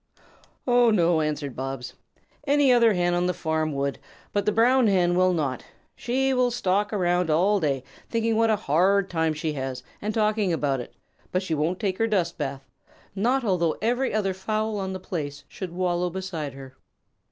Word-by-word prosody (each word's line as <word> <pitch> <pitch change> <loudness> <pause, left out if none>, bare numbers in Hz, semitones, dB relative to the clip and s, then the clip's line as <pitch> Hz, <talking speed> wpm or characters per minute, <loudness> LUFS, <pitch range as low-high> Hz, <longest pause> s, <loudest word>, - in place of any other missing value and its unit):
"Oh 245 -1 +4
no," 170 -6 +3
answered 150 -3 -3
Bobs. 135 -1 -5 0.5
"Any 285 -2 +4
other 235 -3 +5
Hen 175 -1 +1
on 175 0 +1
the 180 - -1
farm 160 -2 -1
would, 140 0 -2 0.3
but 205 0 0
the - - +4
Brown 240 +3 +4
Hen 180 -3 +3
will 185 0 +4
not. 145 -7 -2 0.3
She 265 +2 0
will 250 -1 +3
stalk 205 -3 0
around 180 -4 +1
all 190 +7 +3
day 140 -6 -1 0.3
thinking 230 -1 0
what 225 0 +3
a 220 - +4
hard 190 +4 +2
time 160 -2 0
she 155 0 -2
has 130 -2 -4 0.2
and 210 - -2
talking 215 -3 +1
about 145 -5 0
it, 120 - -9 0.4
but 185 +1 0
she 170 - -2
won't 160 +4 0
take 190 -3 -2
her 225 - +2
dust 180 -7 0
bath, 135 -2 -4 0.5
not 245 +7 +1
although 175 -7 +1
every 245 +4 0
other 200 -3 0
fowl 215 +2 -2
on 190 -1 -3
the 185 - -5
place 145 -6 -5
should 185 -3 -7
wallow 180 0 0
beside 170 -6 -5
her." 135 -1 -11
185 Hz, 185 wpm, -25 LUFS, 155-215 Hz, 0.5 s, other